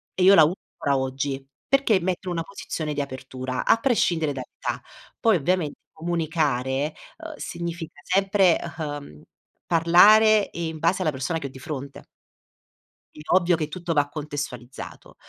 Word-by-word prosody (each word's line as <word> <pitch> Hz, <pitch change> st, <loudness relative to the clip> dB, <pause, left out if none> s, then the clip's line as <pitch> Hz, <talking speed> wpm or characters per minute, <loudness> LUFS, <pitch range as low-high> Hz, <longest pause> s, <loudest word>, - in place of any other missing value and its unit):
E 185 Hz, -, +1 dB
io 195 Hz, -, +8 dB
la 160 Hz, -, +8 dB
uso 170 Hz, +5 st, -1 dB, 0.2 s
ancora 140 Hz, -1 st, +1 dB
oggi, 135 Hz, +1 st, -3 dB, 0.2 s
perché 270 Hz, -8 st, +3 dB
mette 180 Hz, +1 st, -2 dB
in 180 Hz, -, -1 dB
una 165 Hz, -1 st, -2 dB
posizione 155 Hz, -5 st, -5 dB
di 145 Hz, -, -1 dB
apertura, 130 Hz, -1 st, -5 dB
a -, -, +6 dB
prescindere 175 Hz, -, +1 dB
dall'età. 130 Hz, -2 st, -5 dB, 0.4 s
Poi 225 Hz, -2 st, +4 dB
ovviamente 170 Hz, -1 st, 0 dB
comunicare, 155 Hz, -4 st, -1 dB, 0.2 s
uhm, 320 Hz, 0 st, -8 dB
significa 170 Hz, -, -6 dB
sempre, 195 Hz, -1 st, +3 dB, 0.2 s
uhm, 145 Hz, -, -6 dB, 0.5 s
parlare, 205 Hz, +6 st, +6 dB
ehm, 170 Hz, -, -4 dB
in 160 Hz, -1 st, -7 dB
base 170 Hz, +4 st, +1 dB
alla 155 Hz, -4 st, +1 dB
persona 135 Hz, +5 st, -2 dB
che 140 Hz, -, -5 dB
ho -, -, -10 dB
di 130 Hz, -, -12 dB
fronte. 140 Hz, 0 st, -7 dB, 1.1 s
È -, -, -12 dB
ovvio 180 Hz, -1 st, +4 dB
che 155 Hz, -2 st, -2 dB
tutto 170 Hz, +1 st, -4 dB
va 145 Hz, -1 st, +2 dB
contestualizzato. 145 Hz, -5 st, -7 dB
160 Hz, 155 wpm, -24 LUFS, 140-180 Hz, 1.1 s, io